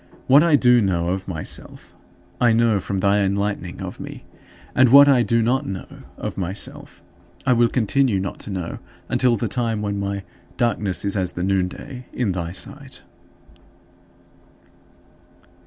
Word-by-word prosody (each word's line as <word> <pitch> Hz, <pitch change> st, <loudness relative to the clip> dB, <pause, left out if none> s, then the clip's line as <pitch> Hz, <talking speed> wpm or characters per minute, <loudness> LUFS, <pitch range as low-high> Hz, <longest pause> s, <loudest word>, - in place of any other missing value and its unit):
What 140 Hz, +3 st, +6 dB
I 165 Hz, -2 st, +4 dB
do 125 Hz, -3 st, +5 dB
know 85 Hz, -4 st, 0 dB
of 95 Hz, +1 st, -3 dB
myself, 80 Hz, -4 st, -7 dB, 0.5 s
I 120 Hz, -2 st, +5 dB
know 115 Hz, -2 st, +3 dB
from 95 Hz, 0 st, -3 dB
thy 100 Hz, +1 st, +3 dB
enlightening 100 Hz, -2 st, -2 dB
of -, -, -7 dB
me; -, -, -8 dB, 0.5 s
and 130 Hz, -1 st, +5 dB
what 140 Hz, +3 st, +9 dB
I 135 Hz, -3 st, +5 dB
do 115 Hz, -1 st, +2 dB
not 130 Hz, +5 st, 0 dB
know 95 Hz, -1 st, -5 dB, 0.3 s
of -, -, -5 dB
myself, 95 Hz, +2 st, -5 dB, 0.4 s
I 130 Hz, -, +4 dB
will 120 Hz, -1 st, +3 dB
continue 125 Hz, -2 st, +1 dB
not 95 Hz, +1 st, -5 dB
to -, -, -7 dB
know 90 Hz, -4 st, -4 dB, 0.3 s
until 125 Hz, -2 st, +3 dB
the -, -, -2 dB
time 115 Hz, -4 st, -2 dB
when 100 Hz, -1 st, -2 dB
my 100 Hz, 0 st, -3 dB, 0.3 s
"darkness 105 Hz, -6 st, 0 dB
is 100 Hz, -, 0 dB
as 95 Hz, -3 st, -1 dB
the 90 Hz, -, -4 dB
noonday" 95 Hz, +7 st, -2 dB
in 120 Hz, -6 st, 0 dB
thy 85 Hz, -2 st, -3 dB
sight. 90 Hz, -, -7 dB
105 Hz, 155 wpm, -22 LUFS, 95-120 Hz, 0.5 s, what